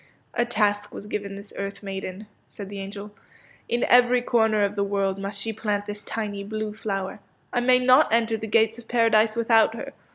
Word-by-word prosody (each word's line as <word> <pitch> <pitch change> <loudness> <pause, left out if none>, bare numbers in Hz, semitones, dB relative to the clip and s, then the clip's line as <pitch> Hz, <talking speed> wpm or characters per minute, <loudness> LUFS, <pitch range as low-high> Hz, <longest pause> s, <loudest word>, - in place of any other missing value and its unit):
A 240 - +1
task 205 -3 0
was - - -8
given 205 -1 -4
this 200 +1 -7
earth 200 +1 -5
maiden," 195 +1 -6 0.2
said 200 -2 -9
the 200 -1 -7
angel. 200 +1 -7 0.3
'' - - -29
In 240 +1 0
every 245 0 +5
corner 220 -3 +2
of 200 0 0
the 200 - +1
world 195 -1 -1
must 200 +1 -4
she 225 +1 -3
plant 205 -1 -2
this 205 0 -6
tiny 205 -3 -4
blue 215 +1 -4
flower. 195 -2 -4 0.3
I 245 - +2
may 250 +1 +4
not 255 +3 +5
enter 230 0 +2
the 220 0 -5
gates 225 +1 +2
of 230 - -14
Paradise 225 -2 +3
without 225 -1 +3
her. 275 +4 -7
215 Hz, 200 wpm, -25 LUFS, 200-230 Hz, 0.3 s, every